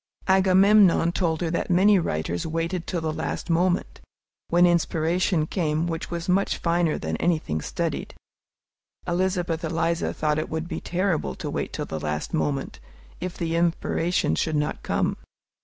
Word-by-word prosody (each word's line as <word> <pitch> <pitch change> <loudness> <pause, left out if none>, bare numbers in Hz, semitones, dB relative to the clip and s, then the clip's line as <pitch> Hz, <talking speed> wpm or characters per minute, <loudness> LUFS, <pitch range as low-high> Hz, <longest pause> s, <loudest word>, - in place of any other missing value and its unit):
Agamemnon 190 -1 +5
told 165 -3 -1
her 165 -2 -1
that 170 - -2
many 190 +3 +5
writers 85 - -2
waited 165 +2 -2
till 175 - -2
the 160 -1 -2
last 170 - -3
moment, 175 +2 0 0.5
when 175 +1 +5
inspiration 170 0 +1
came 155 -2 -1
which 165 -1 -4
was 170 0 -4
much 190 +2 +1
finer 170 -2 +1
than 80 0 -3
anything 155 - 0
studied. - - -3 0.9
Elizabeth 175 -2 0
Eliza 165 +1 0
thought 150 0 0
it - - -3
would 160 +1 -3
be - - -5
terrible 180 -2 -1
to - - -5
wait - - -3
till - - -4
the 80 - -5
last 75 0 -3
moment, 145 -4 -2 0.4
if 180 0 -5
the 165 -1 -2
inspiration 170 - +1
should 155 - 0
not 150 0 -1
come! - - -1
170 Hz, 155 wpm, -25 LUFS, 155-180 Hz, 0.9 s, Agamemnon